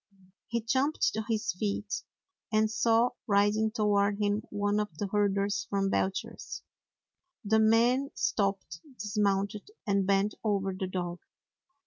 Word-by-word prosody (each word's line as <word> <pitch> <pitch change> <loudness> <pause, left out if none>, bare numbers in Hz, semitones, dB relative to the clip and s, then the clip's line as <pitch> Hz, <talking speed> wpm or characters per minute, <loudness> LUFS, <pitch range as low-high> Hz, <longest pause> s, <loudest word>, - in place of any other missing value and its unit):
He 235 0 -1
jumped 265 +7 +1
to 220 - -2
his 220 0 0
feet, 200 +1 -2 0.5
and 215 0 +2
saw 225 +2 +3 0.2
riding 205 +1 +3
toward 205 -2 +2
him 205 0 +1
one 205 0 0
of 205 -7 -4
the 205 - -2
herders 200 -1 +1
from 195 -1 0
Belcher's. 190 +1 -2 0.8
The 220 +2 +3
man 235 +5 +4
stopped, 195 -5 -1 0.2
dismounted, 200 - -1 0.2
and 200 -2 +1
bent 200 +1 +2
over 195 -3 0
the 185 0 -3
dog. 175 -1 -4
205 Hz, 125 wpm, -30 LUFS, 195-220 Hz, 0.8 s, man